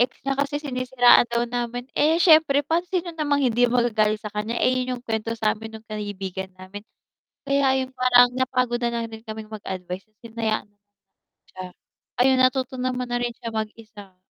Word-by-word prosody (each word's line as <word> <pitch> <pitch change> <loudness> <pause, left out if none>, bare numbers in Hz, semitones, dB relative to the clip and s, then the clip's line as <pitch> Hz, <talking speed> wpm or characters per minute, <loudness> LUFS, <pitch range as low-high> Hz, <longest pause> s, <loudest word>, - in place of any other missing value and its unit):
ex 245 - +3
niya 275 0 0
kasi 285 +1 0
sinisiraan 255 -3 +4
daw 235 0 0
namin, 240 0 -4
eh, 315 +2 +3
siyempre 310 -4 +5
pa 325 +3 +1
sino 360 -2 -2
namang 290 -3 0
hindi 245 0 +3
magagalit 220 -3 +1
sa 210 - -7
kaniya, 215 +3 -3
eh, - - +4
yun 255 0 -2
yung 240 - -12
kwento 225 0 -2
samin 220 0 -2
nung 220 - -15
kaibigan 195 -3 -5
namin. 185 +2 -10 0.7
Kaya 275 -1 +2
yung 260 - -17
parang 245 -1 +6
napagod 250 -2 0
na 235 - +1
lang 230 -1 -2
rin 220 0 -10
kaming 220 -1 -8
mag-advice 185 -3 -6 0.2
hinayaan 225 -2 -3 0.8
siya. 185 0 -8 0.6
Ayun 260 0 +4
natuto 255 0 +1
naman 250 0 -2
na 245 0 -1
rin 240 -1 -2
siya 230 - -6
mag-isa. 215 -3 -7
240 Hz, 170 wpm, -23 LUFS, 215-255 Hz, 0.8 s, parang